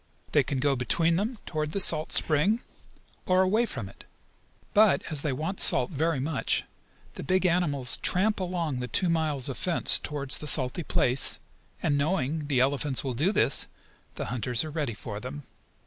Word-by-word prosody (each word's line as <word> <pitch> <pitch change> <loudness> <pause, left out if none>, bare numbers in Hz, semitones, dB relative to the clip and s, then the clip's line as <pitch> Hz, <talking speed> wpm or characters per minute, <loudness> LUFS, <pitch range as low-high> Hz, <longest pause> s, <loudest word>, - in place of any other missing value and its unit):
They - - +4
can 140 - -3
go 140 +1 +1
between 165 +7 +1
them 220 +5 -3
toward 155 -1 -4
the 200 - -1
salt 160 -4 +4
spring, 190 +10 +2 0.7
or 185 0 +3
away 215 +6 +1
from 115 - -6
it. 95 - -15 0.7
But, 210 -1 +4
as 150 -3 -1
they 150 - -2
want 160 +9 -4
salt - - +6
very 160 -1 -1
much, 145 +2 -1 0.5
the - - -8
big 185 0 0
animals 150 -8 +1
tramp 205 +4 0
along 175 -7 -3
the 125 - -4
two 180 +7 -1
miles 155 -5 -1
of 135 - -6
fence 175 -2 +2
toward 140 -2 -6
the 150 - +3
salty 130 +3 +3
place, 130 -4 +1 0.5
and, 145 -2 +1
knowing 150 -1 -1
the 135 -4 +1
elephants 135 0 0
will 130 -2 -3
do 150 - 0
this, 140 - +2 0.5
the - - -5
hunters 120 0 -1
are 155 - -7
ready 145 -7 -3
for 105 -1 -7
them. 135 +6 -8
150 Hz, 180 wpm, -27 LUFS, 135-180 Hz, 0.7 s, salt